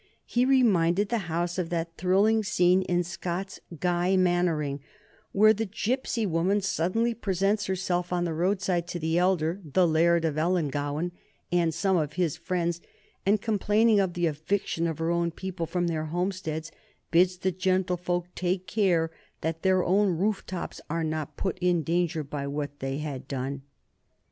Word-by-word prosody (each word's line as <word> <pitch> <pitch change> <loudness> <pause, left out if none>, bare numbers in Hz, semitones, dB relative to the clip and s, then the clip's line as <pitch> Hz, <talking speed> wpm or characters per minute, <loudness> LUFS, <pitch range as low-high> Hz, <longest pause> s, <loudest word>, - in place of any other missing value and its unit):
He 245 +1 +1
reminded 205 -8 +3
the 235 - +1
House 175 +2 -1
of 170 -2 -2
that 165 -1 -3
thrilling 205 +5 +3
scene 185 -2 +3
in 180 -1 0
Scott's 180 +2 -5 0.2
"Guy 180 +1 +2
Mannering" 175 -6 +1 0.5
where 215 +2 +6
the 220 +1 -2
gypsy 230 +2 -1
woman 180 +4 +1
suddenly 195 +5 0
presents 200 -1 0
herself 180 -2 -1
on 175 -1 0
the 165 - -2
roadside 180 0 0
to 175 - -4
the 160 +1 +1
elder, 180 0 +1
the 170 +4 +2
Laird 165 +1 +3
of 155 -1 0
Ellangowan 155 -1 0 0.4
and 175 -2 +2
some 185 +3 +1
of 150 -3 -1
his 175 -5 0
friends, 170 0 -2 0.5
and, 205 0 +3
complaining 215 0 +3
of 190 -3 0
the 175 0 +1
eviction 165 +2 -1
of 160 -3 -3
her 165 +1 0
own 170 0 +1
people 175 0 -5
from 175 +1 -1
their 160 -2 -1
homesteads, 170 -1 -3 0.4
bids 180 +2 +4
the 190 +1 0
gentlefolk 180 -1 0
take 185 +1 -1
care 185 -5 +1 0.3
that 165 0 -2
their 185 -1 +3
own 190 -1 +2
roof 200 +3 0
trees 185 -2 -5
are 165 +1 -1
not 155 -2 -3
put 190 -1 -2
in 175 -2 +2
danger 170 0 0
by 140 0 -5
what 145 0 -4
they 135 +1 -3
had 145 -3 -5
done. 135 0 -4
175 Hz, 165 wpm, -27 LUFS, 165-190 Hz, 0.5 s, where